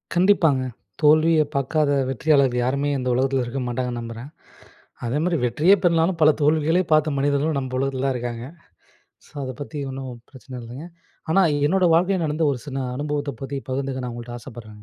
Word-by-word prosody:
கண்டிப்பாங்க. 170 -7 +3 0.4
தோல்விய 155 +1 +5
பாக்காத 145 +2 +1 0.2
வெற்றியாளர்கள் 135 -1 +2
யாருமே 140 +3 0
இந்த 125 -1 -2
உலகத்தில 130 +1 +1
இருக்க 120 +3 -4
மாட்டாங்கன்னு 120 0 -3
நம்புறேன் 115 +2 -7 0.8
அதேமாரி 155 +8 0
வெற்றியே 150 +11 +4
பெறலைனாலும் 170 0 +2
பல 155 - +7
தோல்விகளே 155 +4 +3
பார்த்த 155 0 +4
மனிதர்களும் 145 +2 +1
நம்ப 130 -1 -5
உலகத்தில 135 0 -1
தான் 135 - +1
இருக்காங்க. 120 -1 -4 0.8
ஸோ - - -22
அத 130 -1 -4
பத்தி 145 +1 -6
ஒண்ணும் 130 0 -6 0.2
பிரச்சன 130 -1 -10
இல்லங்க. 120 +6 -9 0.5
ஆனா 195 - +4 0.3
என்னோட 185 +4 +2
வாழ்க்கையில 180 +1 +2
நடந்த 155 +2 0
ஒரு 135 - -2
சின்ன 135 -1 -4 0.2
அனுபவத்த 145 0 -2
பத்தி 135 +1 -5
பகிர்ந்துக்க 130 0 -3
நா 125 - -4
உங்கள்ட்ட 120 0 -8
ஆசப்பட்றேங்க. 110 -4 -11
140 Hz, 160 wpm, -23 LUFS, 130-155 Hz, 0.8 s, பல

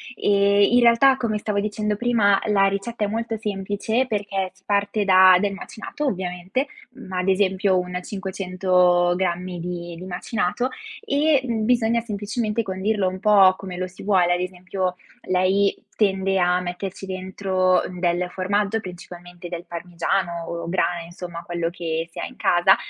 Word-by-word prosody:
Ehm, 200 -1 +3
in 245 - +6
realtà, 240 +3 +6
come 215 -3 -1
stavo 210 -1 -2
dicendo 210 0 -1
prima, 215 -5 +3
la 200 -2 +3
ricetta 200 +3 -2
è - - -1
molto 225 +1 -3
semplice 210 +4 -1
perché 200 -4 -2
si 190 - -28
parte 205 0 0
da 185 -1 +7
del 200 +1 0
macinato 230 +8 -6
ovviamente, 185 +6 -2 0.3
ma 190 -8 -6
ad 180 - -2
esempio 190 0 +2
un 180 0 -2
500 185 -2 +1
grammi 180 -1 -2
di 175 0 -5
di 180 - -9
macinato 210 +5 -2 0.4
e, 295 -5 +3
mhmm, 225 -3 -1
bisogna 235 -1 +2
semplicemente 215 +1 -2
condirlo 195 +1 -1
un 185 0 -4
po' 195 -2 +6
come 185 -2 -7
lo 185 0 -2
si 180 - -14
vuole. 185 -3 +3
Ad 175 - 0
esempio, 180 0 -3 0.3
lei 185 +2 +2 0.2
tende 195 -2 +1
a 180 0 +3
metterci 180 +2 -5
dentro 185 0 0 0.2
del 175 0 0
formaggio, 200 +3 0
principalmente 175 -2 -10
del 175 0 -6
parmigiano 170 0 -2
o 170 0 -5
grana 175 -1 0
insomma, 170 0 -8
quello 170 -1 -2
che 165 -1 -3
si - - -9
ha - - -2
in 255 - -10
casa, 175 +2 +4
190 Hz, 155 wpm, -23 LUFS, 180-210 Hz, 0.4 s, da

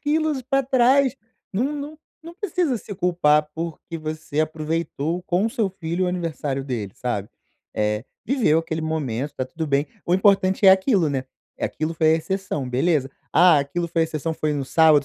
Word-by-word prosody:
quilos 305 -2 0
pra 270 +2 +1
trás. 265 +1 +3 0.4
Não 255 +9 0
não 295 +1 -6 0.2
não 335 +1 -10
precisa 355 - -1
se 205 -1 -8
culpar, 170 -5 +2
porque 165 +1 -5
você 155 -1 -3
aproveitou 160 +1 -2
com 180 +3 +1
o 230 - -2
seu 225 -7 0
filho 180 -1 -2
o 180 - +1
aniversário 155 -6 -2
dele, 115 -8 -4
sabe. 110 -5 -3 0.5
Eh, 105 +1 0 0.2
viveu 230 - +3
aquele 165 0 -3
momento, 145 -4 -2
tá 130 - -2
tudo 160 +5 -5
bem, 140 0 +1 0.2
o 175 - -1
importante 190 +1 +4
é 190 - +11
aquilo, 190 - +4
né, 135 -2 -2 0.3
aquilo 155 +1 -2
foi 155 0 +2
a - - +4
exceção, 175 -5 -3
beleza. 135 +2 +1 0.2
"Ah, 175 -3 +6
aquilo 170 +5 -2
foi 165 0 +1
a - - +3
exceção, 160 0 -3
foi 155 -1 -1
no 145 -2 -2
sábado, 155 -2 +5
165 Hz, 180 wpm, -23 LUFS, 150-200 Hz, 0.5 s, é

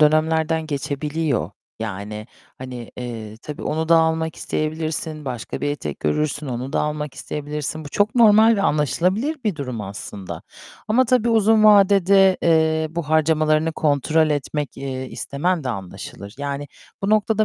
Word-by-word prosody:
dönemlerden 160 +1 +2
geçebiliyor, 145 -1 -2 0.3
yani, 105 0 -5 0.3
hani, 125 -2 -8
eee, 115 -3 -6
tabii 150 -1 -7
onu 160 +1 -2
da 165 - +7
almak 160 0 0
isteyebilirsin, 155 0 -3
başka 125 -4 -5
bir 145 - 0
etek 145 - -5
görürsün, 150 0 -1
onu 125 +1 -4
da - - +1
almak 150 -2 -3
isteyebilirsin. 150 +2 -4
Bu - - -7
çok 205 +7 +1
normal 225 -1 +6
ve 200 - 0
anlaşılabilir 185 - +1
bir 205 -6 0
durum 125 -6 -4
aslında 100 -1 -7 0.5
ama 240 +5 +4
tabii 240 -1 +2
uzun 220 -1 +4
vadede, 195 -2 +6
eee, 160 -1 +3
bu 170 +1 -3
harcamalarını 155 0 +2
kontrol 155 +1 +2
etmek, 145 0 -2
eee, 130 -1 -5
istemen 160 +5 -2
de - - -2
anlaşılır, 100 -1 -7
yani 145 0 -4 0.3
bu 195 - 0
noktada 215 0 +3
155 Hz, 145 wpm, -22 LUFS, 140-170 Hz, 0.5 s, da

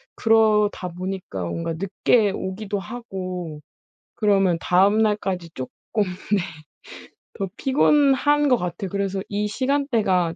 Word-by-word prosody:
그러다 215 -4 +3
보니까 180 - -5
뭔가 165 - -3
늦게 195 +4 +2
오기도 195 +2 -4
하고 185 -7 -6 0.5
그러면 195 -5 +3
다음날까지 195 -2 +2
쪼끔 130 -1 -6 0.3
네 185 -1 -7 1.2
더 195 - -1
피곤한 290 +1 +3
거 250 - +4
같아요. 180 0 -4
그래서 195 0 -2
이 210 +1 -1
시간대가 220 - +1
195 Hz, 245 characters per minute, -23 LUFS, 180-220 Hz, 1.2 s, 거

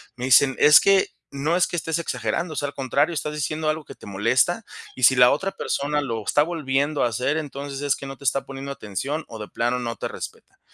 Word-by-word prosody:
me 125 - -4
dicen: 135 +1 +5
"Es 150 +1 +8
que, 195 -1 +4 0.2
no 145 +4 -1
es 180 - +3
que - - -5
estés 165 -1 -1
exagerando, 130 +3 -2
o - - -9
sea, 145 - -1
al - - -12
contrario, 140 +5 0
estás 150 -1 -3
diciendo 155 +1 -3
algo 155 0 -1
que - - -12
te - - -15
molesta, 115 - +1 0.3
y 130 - -8
si 130 +2 +7
la 125 0 +7
otra 190 +7 -1
persona 150 -3 -2
lo 115 -6 -4
está 145 +7 +3
volviendo 145 -3 -1
a - - +3
hacer, 125 +6 -1
entonces 140 -2 -6
es 145 -1 +1
que - - -9
no 135 0 -7
te - - -15
está 135 +1 0
poniendo 135 0 -7
atención 140 - -4
o 115 - -9
de 105 - -6
plano 120 +1 -1
no 120 -1 -4
te - - -4
respeta". - - -9
140 Hz, 240 wpm, -23 LUFS, 125-155 Hz, 0.3 s, Es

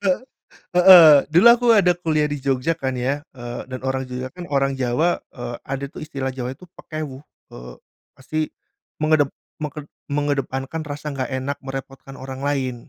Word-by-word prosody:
Hee 195 +3 +1 0.6
heeh. 175 -4 +10 0.2
Dulu 180 +8 +7
aku 240 +1 +5
ada 180 -4 +4
kuliah 155 -3 0
di 145 - -3
Jogja 135 +4 -1
kan 130 -4 -2
ya, 135 +4 -2
eee, 120 -1 -7
dan 130 0 -7
orang 130 0 -1
Jogja 125 0 -5
kan 175 +2 -9
orang 135 -1 +1
Jawa. 130 +7 +1 0.2
Eee, 120 -1 -6
ada 135 +1 -4
tuh - - -10
istilah 135 -3 -4
Jawa 130 0 -5
itu 180 +6 -16
pekewuh. 150 -3 -7 0.3
Eee, 60 0 -10 0.4
pasti 155 +4 -5 0.6
mengedep 155 -2 +3 0.3
meket 150 -1 -6 0.2
mengedepankan 145 +1 -2
rasa 150 +1 -5
nggak 130 0 -3
enak 130 +2 -3
merepotkan 135 0 -7
orang 130 0 -7
lain. 135 -3 -1
140 Hz, 165 wpm, -22 LUFS, 130-155 Hz, 0.6 s, heeh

